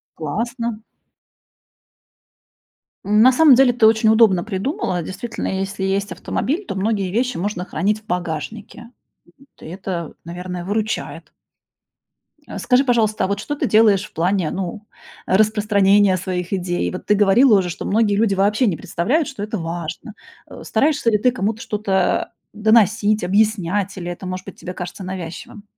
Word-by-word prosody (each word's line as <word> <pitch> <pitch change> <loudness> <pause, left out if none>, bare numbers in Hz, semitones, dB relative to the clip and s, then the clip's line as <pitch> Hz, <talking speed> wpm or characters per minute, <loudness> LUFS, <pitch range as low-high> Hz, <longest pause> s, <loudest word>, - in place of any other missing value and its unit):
Классно. 230 - -4 2.2
М, 210 +1 +3
на 255 +3 +7
самом 290 0 +6
деле, 255 -1 +4
ты 235 -2 +3
очень 220 0 +3
удобно 220 -5 +4
придумала. 215 - -2
Действительно, 190 +8 -5
если 195 0 -4
есть 195 +1 -1
автомобиль, 315 - -3
то - - -5
многие 200 -1 -1
вещи 245 +4 -1
можно 180 0 -3
хранить 210 +3 -1
в - - -32
багажнике. 180 +6 -5 0.7
То - - -16
это, 175 -1 -5
наверное, 180 +1 -6
выручает. 215 +3 -4 1.1
А, - - -7
скажи, 255 +1 +3
пожалуйста, 225 -6 +1
а - - -1
вот 200 +1 -2
что 290 +8 -4
ты 280 - -1
делаешь 210 -3 +4
в - - -16
плане, 175 0 0
ну, 195 +3 -5 0.4
распространения 205 -1 +3
своих 180 -1 -4
идей? 175 - -1
Вот - - -7
ты - - +3
говорила 210 +3 +5
уже, 180 -2 -2
что 170 - -6
многие 210 0 +2
люди 210 -1 +2
вообще 205 +6 +2
не 175 -6 0
представляют, 270 - -1
что 270 -8 -6
это 215 +1 -4
важно. 170 +4 -6 0.3
А, - - -11
стараешься 285 +1 +1
ли 210 - +3
ты 250 +4 +2
кому-то 225 -1 -2
что-то, 205 -2 0
а, - - -16 0.2
доносить, 215 -1 +3
объяснять, 200 0 0
или 175 -1 -5
это, 175 +2 -8
может 185 0 -5
быть, - - -11
тебе 180 - -7
кажется 180 +1 -7
навязчивым? 185 +2 -7
205 Hz, 155 wpm, -20 LUFS, 185-225 Hz, 2.2 s, на